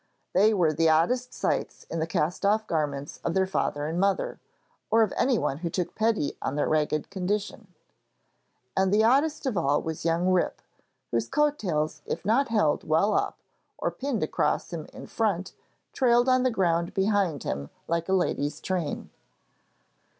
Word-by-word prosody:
They 205 +4 +5
were 175 -7 +2
the 165 +1 +3
oddest 245 +11 +2
sights - - -2
in 165 - -5
the 160 - -1
cast 165 +3 -1
off 215 +2 +2
garments 145 -5 -2
of 170 - -1
their 190 0 +3
father 145 -6 -1
and 165 +3 -2
mother, 195 0 0 0.5
or 225 +1 +5
of 215 - -1
anyone 235 - +1
who 170 0 -3
took 180 +1 -2
pity 220 -9 0
on 135 - -2
their 145 - +1
ragged 155 +1 0
condition; 200 +3 -3 1.1
and 190 0 +2
the 210 +2 +4
oddest 290 +6 +2
of 250 -7 -1
all 145 -2 +2
was 160 -1 -5
young 170 +2 +1
Rip, 185 -1 +1 0.5
whose 115 -1 0
coat 295 0 +2
tails 155 -5 -1
if 170 - -4
not 245 +7 +3
held 210 -10 +1
well 165 +7 +2
up - - 0 0.4
or - - -1
pinned 270 -3 -2
across - - -1
him - - -5
in - - -10
front, - - -1 0.4
trailed 240 -1 +3
on 255 0 +4
the 255 - +3
ground 170 -6 0
behind 195 - +1
him 70 +1 -4 0.2
like 170 +1 -1
a - - +2
lady's 150 -5 0
train. 175 -6 -3
185 Hz, 170 wpm, -27 LUFS, 160-220 Hz, 1.1 s, They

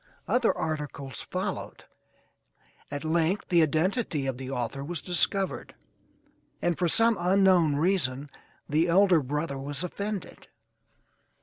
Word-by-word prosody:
Other 245 -2 +3
articles 150 -5 -4
followed, - - -5 1.1
at 145 0 -5
length 165 +4 0
the 175 -3 +5
identity 160 - 0
of 135 -2 -3
the 130 -1 -6
author 135 +1 -3
was 170 +2 -4
discovered, 185 +3 -1 0.8
and 175 -1 0
for 175 - 0
some 225 +5 +3
unknown 180 -4 +4
reason 145 -5 0 0.4
the 155 +4 +2
elder 180 -1 +5
brother 145 +1 -3
was 140 +3 -2
offended. 200 +2 -5
160 Hz, 115 wpm, -27 LUFS, 145-185 Hz, 1.1 s, the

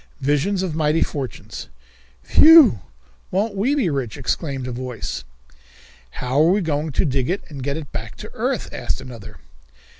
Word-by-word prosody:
Visions 150 +8 +1
of 180 -4 -2
Mighty 155 0 +2
Fortunes. 135 - -6 0.5
"Phew! 305 - +7 0.5
Won't 200 +3 0
we 240 +9 +1
be 265 -10 +1
rich?" 135 -6 -2
exclaimed 135 -1 -2
a - - -4
voice. 125 - -5 0.9
"How 125 - 0
are 160 - +5
we 200 +3 +3
going 155 -2 -1
to - - +2
dig 135 -3 0
it 190 +3 -1
and 140 -4 -8
get 140 +3 -2
it 150 -3 -8
back 110 -5 -6
to - - -10
earth?" - - -2
asked - - -3
another. 115 -6 -10
145 Hz, 160 wpm, -21 LUFS, 130-185 Hz, 0.9 s, Phew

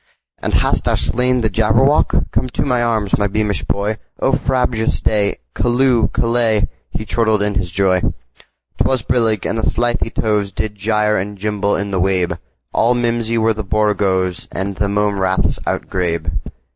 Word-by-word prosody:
"And - - 0
hast - - +1
thou - - +2
slain 125 +1 +1
the 110 - +1
Jabberwock? 115 +8 +2
Come 130 - 0
to 125 - -2
my 125 -3 +1
arms, 110 -4 +1
my 105 - +2
beamish 105 0 -1
boy!O 105 +6 -2
frabjous 125 -4 0
day! 105 -2 +1 0.2
Callooh! 120 -1 +2
Callay!"He 115 -2 -1
chortled 110 -1 +1
in 105 0 0
his 95 -2 -1
joy.'T 95 0 +1 0.7
was 130 -4 +1
brillig, 115 -5 +1
and 115 - -1
the - - +1
slithy 120 0 0
tovesDid 105 0 -1
gyre 105 +1 +1
and 100 +2 -4
gimble 105 0 0
in 100 +1 -3
the 95 - 0
wabe; 90 -2 +1 0.3
All 120 +2 +3
mimsy 115 -1 0
were 115 0 +3
the 110 0 -5
borogoves, 95 -3 0
And 95 0 -3
the 100 0 0
mome 105 0 0
raths 95 0 +1
outgrabe. 85 -3 -1
105 Hz, 155 wpm, -18 LUFS, 100-115 Hz, 0.7 s, All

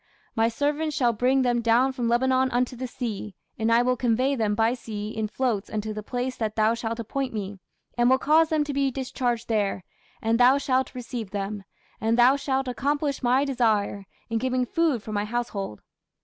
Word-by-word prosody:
My 225 0 +3
servants 290 +5 -1
shall 240 -4 +3
bring 255 +4 +2
them 240 -1 +1
down 235 +3 +3
from 250 -3 -2
Lebanon 260 +2 +2
unto 250 0 0
the 255 +1 -4
sea: 215 -4 -5 0.2
and 225 +1 +1
I 235 +1 +5
will 250 0 +2
convey 250 +3 +1
them 215 -4 0
by 225 +2 +2
sea 210 -4 -6
in 220 0 -3
floats 225 -3 -1
unto 215 0 -3
the 215 - -5
place 250 +3 -3
that 215 -2 -2
thou 220 +1 +3
shalt 230 0 -4
appoint 255 +2 -3
me, 200 -1 -5 0.4
and 240 +1 +5
will 260 - +5
cause 315 +4 +3
them 310 -2 +2
to 290 -1 -4
be 275 0 +1
discharged 250 -2 -2
there, 205 -4 0 0.4
and 225 +1 +1
thou 255 +3 +6
shalt 260 -2 0
receive 240 -4 -5
them: 200 0 -4 0.3
and 225 +1 +1
thou 245 +3 +6
shalt 270 -1 -1
accomplish 285 +3 -1
my 255 +3 +3
desire, 215 -7 0 0.2
in 230 -1 -1
giving 255 +1 0
food 305 -5 0
for 215 - -7
my 205 -1 0
household. 210 - -4
240 Hz, 195 wpm, -25 LUFS, 220-260 Hz, 0.4 s, thou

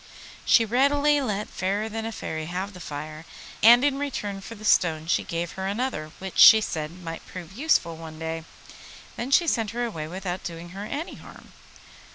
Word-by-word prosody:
She 230 - +5
readily 285 +5 +3
let 210 -5 -2
Fairer 200 +4 -2
than 225 0 -4
a - - -4
Fairy 160 -6 -5
have 185 +4 -4
the 180 - -11
fire, 155 0 -7 0.4
and 240 +3 +8
in 275 -1 +1
return 205 -9 -4
for 230 - -9
the 215 0 -10
stone 160 -6 +3
she 165 - +1
gave 170 0 -3
her 190 0 -4
another, 205 -7 -2
which, 190 -1 -6
she 220 - +10
said, 155 -7 -3
might 165 -1 -6
prove 180 0 -9
useful 205 - +1
some 160 -1 -9
day. 160 0 -4 0.7
Then 240 - -4
she 340 +5 +5
sent 225 -9 0
her 240 +2 -2
away 160 -10 -5
without 180 +1 -5
doing 170 0 -7
her 195 +3 -7
any 295 +9 -5
harm. - - -14
195 Hz, 190 wpm, -25 LUFS, 165-235 Hz, 0.7 s, she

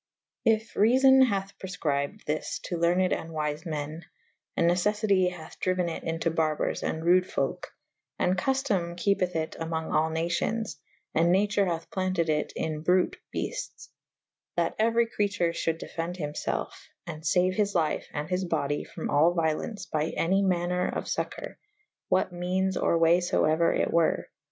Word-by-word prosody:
If 220 0 +2
reafon 265 +5 +6
hath 195 -2 -3
prefcrybed 145 -7 -2
this 150 +1 -2
to 175 - -3
lerned 180 +2 +3
and 165 - -4
wyfe 155 +1 -3
me« 155 +1 -4 0.3
/ - - -46
and 170 - +3
necef 185 +5 +2
fity 195 -4 +3
hathe 170 -3 -11
dryuen 185 -1 0
it - - -7
into 165 0 -1
barbours 155 -2 0
and 160 +1 -3
rude 180 +1 +4
folke 135 - -2 0.3
/ - - -56
& - - -57
cuftome 190 -3 0
kepeth 185 -1 +1
it 160 -1 -2
among 160 0 -3
all 155 +1 +2
nacions/and 170 0 -1
nature 200 +1 +2
hathe 165 -1 -2
planted 185 -3 0
it 150 -1 0
in 155 -1 -3
bruyte 180 +2 +2
beltes' - - -5 0.3
/ - - -66
that - - +1
euery 230 +1 +3
creature 200 -6 0
fhulde 165 -1 -1
defe^de 170 +2 -4
hym 150 -3 -4
felfe - - -4 0.2
and 155 -2 -7
faue 180 +3 +2
his 205 0 0
lyfe 160 -3 +1
and 150 +1 -4
his 180 +1 -1
body 145 -5 -1
from - - -6
all 160 +5 +4
violence 165 +6 -1
by 155 -1 -1
any 190 +4 +2
maner 180 -1 +1
of - - -3
focour - - -4 0.3
/ - - -53
what 180 - +2
meanes 185 +2 0
or 170 - +2
way 165 +2 +4
fo 175 - +1
euer 160 +2 +3
it - - 0
were. 170 -1 +2
175 Hz, 170 wpm, -28 LUFS, 160-190 Hz, 0.3 s, reafon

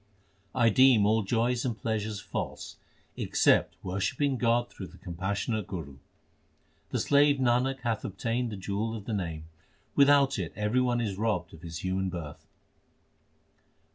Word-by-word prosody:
1 115 -4 +3
deem 130 -5 +6
all 110 +2 +3
joys 115 +4 0
and 120 -4 -2
pleasures 110 -2 -2
false - - -5 0.4
except - - +2
worshipping 100 +10 0
God 120 0 +2
through 95 - -8
the 90 - -16
compassionate 100 +4 -3
Guru. 75 -7 -7 0.9
The - - -1
slave 145 0 +4
Nanak 130 +1 +1
hath 115 -4 -1
obtained 115 +4 -2
the 105 - -5
jewel 105 +4 -2
of 105 -3 -8
the 115 - -3
Name, 85 -6 -3 0.5
without 140 -3 +5
it 85 -4 -4
everybody 120 +3 +1
is 100 -2 -4
robbed 110 -1 -1
of 80 - -12
his 85 -1 -7
human 95 0 -1
birth. 85 -5 -7
110 Hz, 140 wpm, -29 LUFS, 95-125 Hz, 0.9 s, deem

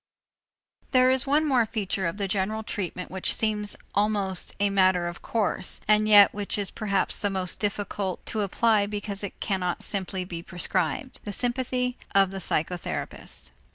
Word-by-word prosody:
There 255 0 +6
is 260 +1 +4
one 295 +3 +3
more 260 -5 +3
feature 195 -4 -2
of 170 - -4
general 200 +2 -1
treatment 185 -3 -4
which 190 0 0
seems 210 -2 -1 0.2
almost 200 -3 0
a 200 0 +2
matter 185 -3 +3
of 175 - -7
course, 220 -5 -1
and 215 0 +4
yet 205 -2 +8
which 205 0 -2
is 200 -2 -1
perhaps 200 -3 0
the 205 - 0
most 185 -2 -2
difficult 205 -2 -2
to 220 - -2
apply 205 +1 +2
because 205 -1 -5
it 200 - -6
cannot 185 -4 -1
simply 190 -2 -2
be 170 -2 -6
prescribed: 180 - -2
the 205 - -4
sympathy 250 +2 -1 0.2
of 195 -1 +5
the 195 - -5
psychotherapist. 165 - -2
200 Hz, 155 wpm, -26 LUFS, 185-215 Hz, 0.2 s, yet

